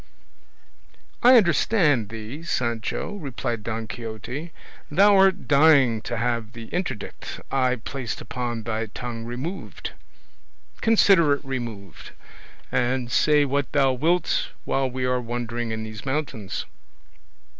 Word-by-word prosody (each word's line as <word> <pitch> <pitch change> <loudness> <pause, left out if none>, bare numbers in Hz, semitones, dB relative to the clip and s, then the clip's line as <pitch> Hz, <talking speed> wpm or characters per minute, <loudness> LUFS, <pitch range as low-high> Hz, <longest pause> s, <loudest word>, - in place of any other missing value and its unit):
"I 250 +1 +8
understand 165 - +3
thee, 110 +7 -7
Sancho," 120 - -2
replied 130 - -4
Don 115 +1 -4
Quixote; 120 - -6 0.4
"thou 200 +6 +5
art 190 0 +4
dying 140 -6 +5
to 120 - -4
have 115 -1 -1
the 115 -1 -9
interdict 175 - -4
I 130 -2 +2
placed 125 0 -5
upon 120 -2 -4
thy 110 0 -2
tongue 115 +1 -6
removed; 130 +11 -5 0.9
consider 195 -9 +5
it 140 - -4
removed, 115 -8 -6 0.6
and 125 0 0
say 150 +4 +4
what 140 0 -1
thou 135 -3 +4
wilt 165 +7 +1 0.2
while 135 -1 0
we 130 0 -2
are 125 0 +1
wandering 120 0 -3
in 110 0 -3
these 110 -1 -8
mountains." 135 -8 -3
125 Hz, 120 wpm, -24 LUFS, 115-150 Hz, 0.9 s, I